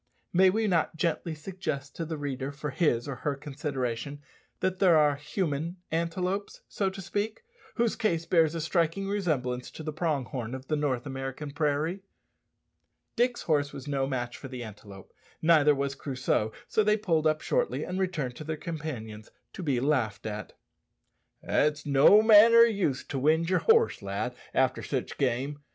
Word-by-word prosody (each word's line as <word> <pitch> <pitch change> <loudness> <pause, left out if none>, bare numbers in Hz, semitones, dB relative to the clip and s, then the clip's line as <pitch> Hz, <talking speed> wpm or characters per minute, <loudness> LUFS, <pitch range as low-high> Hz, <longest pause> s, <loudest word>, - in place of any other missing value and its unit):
May 185 +2 +6
we 220 +4 +1
not 170 -5 +1
gently 165 0 -1
suggest 150 -4 -5
to 165 - -3
the 160 0 -4
reader 140 -1 -4
for 150 0 -5
his 130 -5 +1
or 135 -3 -4
her 145 -2 -2
consideration 140 -2 -4 0.4
that 185 0 -1
there 180 -5 +6
are 150 -2 +4
human 155 +2 -3
antelopes, 180 +4 -2
so 195 -2 -1
to 190 +1 -9
speak, 205 - -3 0.3
whose 235 -2 +1
case 170 -8 0
bears 165 -2 +3
a 165 - -2
striking 170 +4 0
resemblance 145 -11 -1
to 160 - -9
the 155 0 -4
prong 155 -5 -1
horn 120 0 -5
of 130 0 -10
the 155 - +2
North 140 -4 -1
American 135 +1 -5
prairie? 155 +5 -1 1.1
Dick's 245 0 +1
horse 145 -3 +1
was 135 - -8
no 135 -2 0
match 120 -2 -3
for 135 - -8
the 125 -2 -6
antelope, 100 -3 -12 0.3
neither 155 -3 +5
was 140 0 -1
Crusoe; 130 -5 -1 0.2
so 215 - +2
they 210 +1 +3
pulled 165 -7 +1
up 155 0 +1
shortly - - 0
and 180 +1 -4
returned 155 -10 -2
to - - -7
their 155 0 -4
companions, 125 -11 -6 0.2
to - - -7
be 140 -7 0
laughed 120 -8 0
at. 105 -1 -5 0.9
"It's 150 0 +1
no 145 +10 +6
manner 225 +1 +8
o' - - +11
use 200 - +1
to 135 - -4
wind 160 +5 +2
yer 185 - +3
horse, 455 - +3
lad, 100 +5 -3 0.2
after 130 -1 +1
sich 130 -3 -4
game. 135 +2 -1
150 Hz, 170 wpm, -28 LUFS, 135-180 Hz, 1.1 s, o